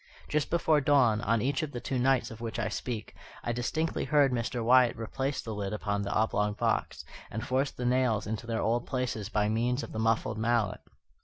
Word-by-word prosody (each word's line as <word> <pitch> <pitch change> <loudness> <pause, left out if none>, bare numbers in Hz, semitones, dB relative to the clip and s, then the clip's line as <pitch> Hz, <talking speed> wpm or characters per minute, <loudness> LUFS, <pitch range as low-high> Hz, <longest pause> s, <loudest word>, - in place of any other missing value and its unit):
Just 150 -1 0
before 160 -3 +3
dawn, 130 -6 +4
on 115 +1 +1
each 135 +2 0
of 155 -2 -4
the 120 - -3
two 130 +1 -2
nights 130 -1 +2
of 115 0 -10
which 115 -2 -4
I 110 -2 -1
speak, 110 +1 -4 0.3
I 120 - -1
distinctly 155 +7 -1
heard 145 -3 +4
Mr. 120 -1 -2
Wyatt 125 0 +5
replace 135 +5 -2
the 110 - -5
lid 100 -1 -3
upon 100 -1 -1
the 100 0 -3
oblong 105 -1 +1
box, - - -1 0.2
and 110 +3 -4
force 135 +2 +1
the 125 - -6
nails 125 -4 +2
into 110 +2 -4
their 115 -1 -1
old 120 +2 0
places 125 -6 -2
by 105 -2 +1
means 120 +5 0
of - - -7
the 110 - -4
muffled 110 0 +1
mallet. 115 -2 +1
120 Hz, 210 wpm, -29 LUFS, 110-130 Hz, 0.3 s, Wyatt